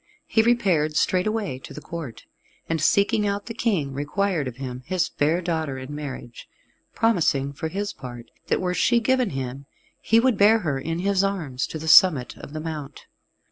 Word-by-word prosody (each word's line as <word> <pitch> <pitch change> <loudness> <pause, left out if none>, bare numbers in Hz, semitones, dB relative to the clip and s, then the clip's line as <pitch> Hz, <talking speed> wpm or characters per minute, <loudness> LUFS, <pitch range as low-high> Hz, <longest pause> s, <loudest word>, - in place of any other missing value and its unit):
He 220 - +3
repaired 190 -10 +2
straightway 185 -5 0
to - - -11
the - - -6
Court, 155 -6 -8 0.4
and, 165 -2 -1
seeking 200 +5 +3
out 200 0 -2
the 230 - -6
King, 190 - -1
required 150 +2 -1
of 125 - -6
him 130 -1 -6
his 180 -1 +1
fair 160 +5 0
daughter 160 -5 -2
in 130 +2 -7
marriage, 135 -5 -8 0.5
promising, 150 -11 +1
for 160 - -4
his 200 +5 -3
part, 120 -2 -10 0.2
that - - +1
were 180 -1 -1
she 235 +6 +3
given 255 0 +1
him, 135 0 -5 0.3
he 225 - +4
would 245 -2 +2
bear 210 +3 +6
her 145 -5 -1
in 165 +4 -3
his 195 +1 +1
arms 160 -10 -2
to - - -6
the 160 +1 -7
summit 160 -7 +6
of - - -10
the 155 - -5
mount. 155 -3 -7
160 Hz, 180 wpm, -24 LUFS, 140-200 Hz, 0.5 s, bear